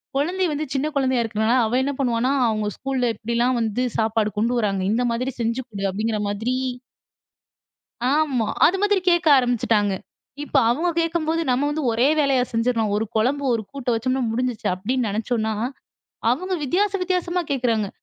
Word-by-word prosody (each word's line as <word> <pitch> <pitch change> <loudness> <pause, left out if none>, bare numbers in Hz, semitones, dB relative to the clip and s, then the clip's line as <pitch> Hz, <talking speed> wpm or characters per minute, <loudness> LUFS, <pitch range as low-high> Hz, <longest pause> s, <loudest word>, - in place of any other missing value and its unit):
குழந்தை 355 +7 0
வந்து 300 +1 -2
சின்ன 275 +2 0
குழந்தையா 260 -3 +2
இருக்கிறதுனால, 220 0 0
அவ 220 - -3
என்ன 280 - 0
பண்ணுவான்னா, 250 0 +1 0.2
அவங்க 215 -1 -1
ஸ்கூல்ல 265 -3 -1
எப்படிலாம் 235 +3 0
வந்து 225 +2 -1 0.2
சாப்பாடு 220 -1 +1
கொண்டு 230 +4 +1
வராங்க, 195 -4 0
இந்த 235 +3 +1
மாதிரி 255 +3 -2
செஞ்சு 230 +3 -1
கொடு 200 -3 -6
அப்படிங்கிற 215 +2 -1
மாதிரி 220 +5 -1 1.6
ஆமா, 280 -7 +1 0.2
அது 365 +4 +3
மாதிரி 410 -2 +2
கேட்க 345 -1 +2
ஆரம்பிச்சுட்டாங்க. 230 -5 +1 0.5
இப்ப 295 - -9
அவங்க 300 +9 +1
கேட்கும்போது 330 -1 0
நம்ம 255 +3 +2
வந்து 300 +1 -2
ஒரே 235 +4 +3
வேலையா 275 -4 +3
செஞ்சுடலாம் 230 -2 0
ஒரு 215 +2 0
குழம்பு, 260 +6 +1
ஒரு 230 - 0
கூட்ட 275 -3 -4
வச்சோம்னா 255 +3 0
முடிஞ்சிச்சு 245 -1 -2
அப்படின்னு 235 +6 -1
நினைச்சோம்னா 220 +1 -1 0.8
அவங்க 365 +10 -1
வித்தியாசம் 390 +7 0
வித்தியாசமா 360 -1 0
கேட்கிறாங்க. 235 -6 0
250 Hz, 155 wpm, -22 LUFS, 225-285 Hz, 1.6 s, அது